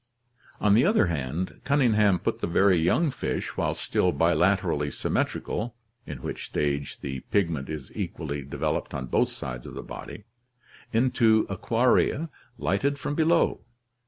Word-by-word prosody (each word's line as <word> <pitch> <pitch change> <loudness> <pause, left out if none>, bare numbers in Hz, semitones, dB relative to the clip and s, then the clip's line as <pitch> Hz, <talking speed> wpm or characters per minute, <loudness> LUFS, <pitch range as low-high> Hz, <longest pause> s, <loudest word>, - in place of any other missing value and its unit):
"On 105 -1 +4
the 115 +4 +5
other 205 - +4
hand, 80 +1 -3
Cunningham 110 -9 +3
put - - -2
the - - 0
very 95 +1 +4
young 135 - +2
fish, 130 - -3
while - - 0
still 90 - +1
bilaterally 85 -2 +2
symmetrical 115 - -2 0.3
(in 70 -4 -7
which - - -4
stage 70 -1 -2
the 65 -1 -4
pigment 85 -9 0
is 75 -4 -6
equally 75 -2 -4
developed 70 +1 -3
on 65 -2 -3
both - - +1
sides 60 -1 -6
of - - -9
the - - -6
body), - - -9 0.7
into 115 -2 +3
aquaria 125 - +2 0.3
lighted 100 - 0
from 145 - -3
below. 165 +2 +2
95 Hz, 140 wpm, -26 LUFS, 75-120 Hz, 0.7 s, the